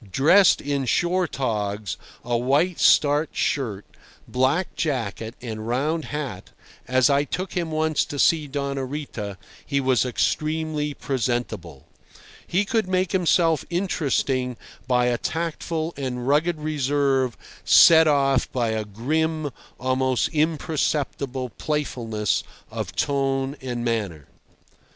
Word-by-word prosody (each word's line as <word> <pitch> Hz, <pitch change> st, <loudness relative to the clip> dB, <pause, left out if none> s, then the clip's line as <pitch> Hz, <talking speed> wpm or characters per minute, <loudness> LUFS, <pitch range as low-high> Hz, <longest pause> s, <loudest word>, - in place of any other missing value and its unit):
Dressed 165 Hz, -, +5 dB
in 140 Hz, -1 st, -1 dB
shore 175 Hz, +9 st, +1 dB
togs, 105 Hz, -, -2 dB, 0.3 s
a 120 Hz, 0 st, 0 dB
white 140 Hz, +9 st, +1 dB
starched 145 Hz, +1 st, +4 dB
shirt, 110 Hz, -8 st, -1 dB, 0.4 s
black 135 Hz, +8 st, 0 dB
jacket, 115 Hz, -6 st, -2 dB
and 110 Hz, -2 st, -5 dB
round 150 Hz, +7 st, 0 dB
hat, 140 Hz, -11 st, -5 dB, 0.4 s
as 130 Hz, 0 st, +4 dB
I 140 Hz, 0 st, +3 dB
took 185 Hz, +6 st, -4 dB
him 170 Hz, -2 st, -2 dB
once 155 Hz, 0 st, +1 dB
to 145 Hz, -, -6 dB
see 155 Hz, +1 st, +3 dB
Doña 140 Hz, -2 st, -3 dB
Rita, 120 Hz, -9 st, -5 dB, 0.3 s
he 140 Hz, -1 st, -1 dB
was 130 Hz, -3 st, +2 dB
extremely 155 Hz, +3 st, -1 dB
presentable. 115 Hz, -, -3 dB, 0.6 s
He 195 Hz, +4 st, +1 dB
could 220 Hz, -1 st, 0 dB
make 185 Hz, -1 st, 0 dB
himself 170 Hz, -4 st, +2 dB
interesting 135 Hz, -8 st, 0 dB, 0.3 s
by 125 Hz, -1 st, +3 dB
a 120 Hz, -1 st, +1 dB
tactful 165 Hz, 0 st, -3 dB
and 125 Hz, -3 st, -4 dB
rugged 155 Hz, +4 st, +2 dB
reserve 140 Hz, -5 st, 0 dB, 0.3 s
set 160 Hz, -1 st, +7 dB
off 135 Hz, -3 st, +2 dB
by 120 Hz, -3 st, 0 dB
a 110 Hz, -1 st, -2 dB
grim, 155 Hz, +8 st, -1 dB, 0.3 s
almost 130 Hz, 0 st, +1 dB
imperceptible, 150 Hz, -4 st, -1 dB
playfulness 115 Hz, -8 st, -1 dB, 0.3 s
of 110 Hz, -6 st, -5 dB
tone 135 Hz, +1 st, 0 dB
and 120 Hz, -2 st, -4 dB
manner. 100 Hz, -11 st, -2 dB
140 Hz, 120 wpm, -24 LUFS, 120-155 Hz, 0.6 s, set